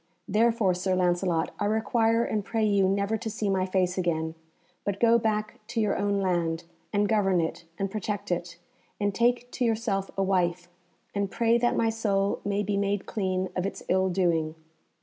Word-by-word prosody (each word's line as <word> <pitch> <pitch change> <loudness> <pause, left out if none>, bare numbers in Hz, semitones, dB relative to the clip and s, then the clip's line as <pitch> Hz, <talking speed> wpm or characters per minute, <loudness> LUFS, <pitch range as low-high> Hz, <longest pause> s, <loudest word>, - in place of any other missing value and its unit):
Therefore, 220 -2 +3
Sir 185 +1 0
Lancelot, 175 -2 +1
I - - 0
require 225 +2 +2
and 215 -3 -1
pray 225 +1 0
you 200 -2 +3
never 200 +3 +1
to 225 0 -4
see 210 -1 -1
my 190 -1 +1
face 185 -1 +1
again, 160 -2 -1 0.5
but 200 -1 -2
go 235 0 +5
back 215 -1 -1
to 235 -1 -2
your 215 -2 +2
own 200 0 0
land, 170 -3 0 0.3
and 205 0 +2
govern 195 -4 +2
it 165 +1 -3
and 195 -1 -2
protect 205 -1 -3
it; 175 -1 -2 0.4
and 205 -1 0
take 245 +3 +1
to 255 - -2
yourself 220 -4 0
a 195 - +2
wife, 175 -2 0 0.4
and 200 -1 -1
pray 235 +2 +2
that 240 0 +2
my 225 - +3
soul 200 -3 0
may 205 0 0
be 205 0 -1
made 200 0 0
clean 185 -3 -1
of 180 - 0
its 195 - -4
ill 190 +1 +3
doing." 170 -4 +1
200 Hz, 185 wpm, -27 LUFS, 185-220 Hz, 0.5 s, go